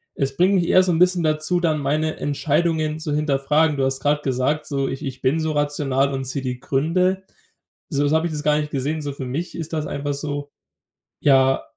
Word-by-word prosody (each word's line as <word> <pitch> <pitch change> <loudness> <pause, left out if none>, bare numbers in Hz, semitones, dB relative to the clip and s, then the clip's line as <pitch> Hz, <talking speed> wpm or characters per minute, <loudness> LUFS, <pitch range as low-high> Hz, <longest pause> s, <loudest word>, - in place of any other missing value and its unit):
es 135 -1 -2
bringt 190 +3 +3
mich 175 -2 +2
eher 185 - +5
so 180 - +1
'n 165 - +1
bisschen 180 -1 +3
dazu, 155 +3 +1
dann 155 -3 +1
meine 155 +3 -1
Entscheidungen 155 +1 0
zu 155 -2 -3
hinterfragen. 150 +1 +1
Du 135 - +1
hast 135 0 -1 0.2
gesagt, 135 +3 0
so, 135 -2 -1
„ich 135 +2 -5
ich 130 -2 -6
bin 145 +5 +1
so 160 -1 -1
rational 145 -2 0
und 135 0 -3
sehe 135 +1 -3
die 125 -1 -4
Gründe“. 180 +8 0 0.7
So, 145 -3 0
jetzt 145 +2 +1
habe 160 +1 +2
ich 165 - -2
das 150 - -3
gar 150 0 +2
nicht 150 0 -3
gesehen. 145 +3 -2
So 145 - -3
für 135 -2 -6
mich 155 +8 -4
ist 165 -1 -6
das 155 -1 -1
einfach 145 0 -3
so: 145 0 -4 0.7
„Ja, 135 -2 +4
150 Hz, 215 wpm, -22 LUFS, 135-160 Hz, 0.7 s, eher